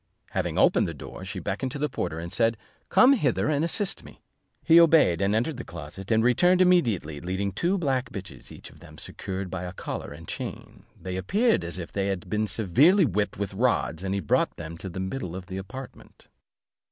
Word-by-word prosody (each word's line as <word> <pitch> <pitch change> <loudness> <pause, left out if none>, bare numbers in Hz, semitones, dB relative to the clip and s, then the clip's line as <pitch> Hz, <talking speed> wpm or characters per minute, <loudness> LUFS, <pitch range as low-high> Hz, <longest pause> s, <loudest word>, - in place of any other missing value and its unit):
Having - - -2
opened - - +4
the - - -5
door, - - -9
she 95 0 -6
beckoned 125 +7 -3
to - - -4
the 150 +1 0
porter, 90 - -3
and 85 +1 -6
said, 115 -1 +2 0.3
"Come 260 +2 +6
hither 145 - +1
and 150 0 +1
assist 190 +4 -1
me." - - -15 0.4
He 165 0 +7
obeyed, 160 - +5
and 100 +2 +2
entered 120 +6 0
the 125 - -5
closet, 85 +4 -9
and 110 -1 +3
returned 175 +10 +4
immediately, 115 - +2
leading 95 +3 -2
two 175 - 0
black 135 -7 -1
bitches, 95 - -9
each - - -11
of - - -18
them - - -14
secured 95 -1 -5
by 95 - -4
a 90 0 -6
collar - - -6
and 80 +3 -11
chain; - - -7
they 95 0 -5
appeared 215 - +2
as 85 +1 -4
if 85 -2 -6
they 100 -1 -1
had 95 -3 -4
been 110 0 +1
severely 135 - +4
whipped 105 -3 -1
with 100 -1 -3
rods, 110 -7 0
and 95 0 -1
he 100 - -1
brought 75 - +1
them 80 -1 -7
into 85 +3 -7
the 90 - -6
middle 95 -2 -4
of 95 -1 -7
the 95 0 -6
apartment. 125 +8 -11
100 Hz, 210 wpm, -26 LUFS, 90-140 Hz, 0.4 s, He